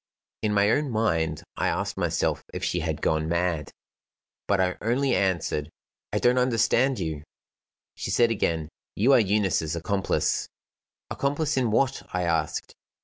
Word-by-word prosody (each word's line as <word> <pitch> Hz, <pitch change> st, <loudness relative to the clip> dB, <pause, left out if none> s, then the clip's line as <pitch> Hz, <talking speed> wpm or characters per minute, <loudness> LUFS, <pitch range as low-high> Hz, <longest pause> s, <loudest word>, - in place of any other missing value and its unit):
In 105 Hz, -, 0 dB
my 100 Hz, +1 st, +4 dB
own 145 Hz, +3 st, +1 dB
mind, 80 Hz, -9 st, 0 dB
I -, -, +1 dB
asked -, -, -1 dB
myself -, -, 0 dB
if -, -, -4 dB
she 90 Hz, -, 0 dB
had 80 Hz, -2 st, -3 dB
gone 80 Hz, 0 st, +1 dB
mad. 85 Hz, -3 st, 0 dB, 0.8 s
But 100 Hz, -1 st, +2 dB
I 90 Hz, -1 st, +1 dB
only 130 Hz, +5 st, +1 dB
answered: 85 Hz, -5 st, 0 dB, 0.4 s
"I -, -, 0 dB
don't 125 Hz, +1 st, +3 dB
understand 125 Hz, +1 st, +2 dB
you." 80 Hz, -3 st, -3 dB, 0.7 s
She -, -, -5 dB
said 120 Hz, -1 st, +3 dB
again: 80 Hz, -7 st, -1 dB, 0.3 s
"You 125 Hz, +7 st, +4 dB
are -, -, +7 dB
Eunice's 95 Hz, -6 st, +1 dB
accomplice." 95 Hz, +4 st, 0 dB, 0.6 s
"Accomplice 145 Hz, +2 st, 0 dB
in 130 Hz, -3 st, +1 dB
what?" 135 Hz, +5 st, +1 dB
I 90 Hz, -, 0 dB
asked. 80 Hz, -3 st, -1 dB
100 Hz, 145 wpm, -26 LUFS, 80-120 Hz, 0.8 s, are